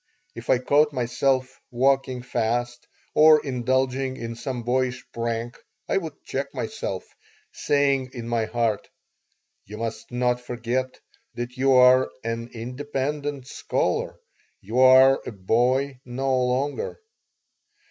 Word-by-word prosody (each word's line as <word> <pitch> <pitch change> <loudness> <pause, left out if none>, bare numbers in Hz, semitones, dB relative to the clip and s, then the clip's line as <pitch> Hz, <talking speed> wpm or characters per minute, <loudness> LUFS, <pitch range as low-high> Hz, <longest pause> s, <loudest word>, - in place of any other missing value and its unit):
If - - -10
I - - +5
caught 145 +4 +3
myself 130 +1 0
walking 130 0 +1
fast 120 0 -2 0.3
or 155 0 +7
indulging 130 +1 0
in 115 -1 -5
some 125 0 -5
boyish 125 +1 -1
prank 115 0 -3 0.3
I - - +1
would 165 -5 -5
check 140 +1 -3
myself, 100 - -4 0.5
saying 140 -2 +1
in 120 -3 -6
my 115 -1 0
heart: 110 -2 -1 0.7
"You 105 +2 -10
must 115 0 -5
not 125 0 0
forget 125 +2 -3 0.4
that 120 +1 -5
you 135 +1 +3
are 130 0 +6
an 115 +1 -4
independent 140 +3 -4
scholar. - - -2 0.4
You 115 +6 -3
are 130 +1 +7
a - - -3
boy 125 +7 +1
no 130 +2 -1
longer." 135 - -2
125 Hz, 120 wpm, -24 LUFS, 120-135 Hz, 0.7 s, or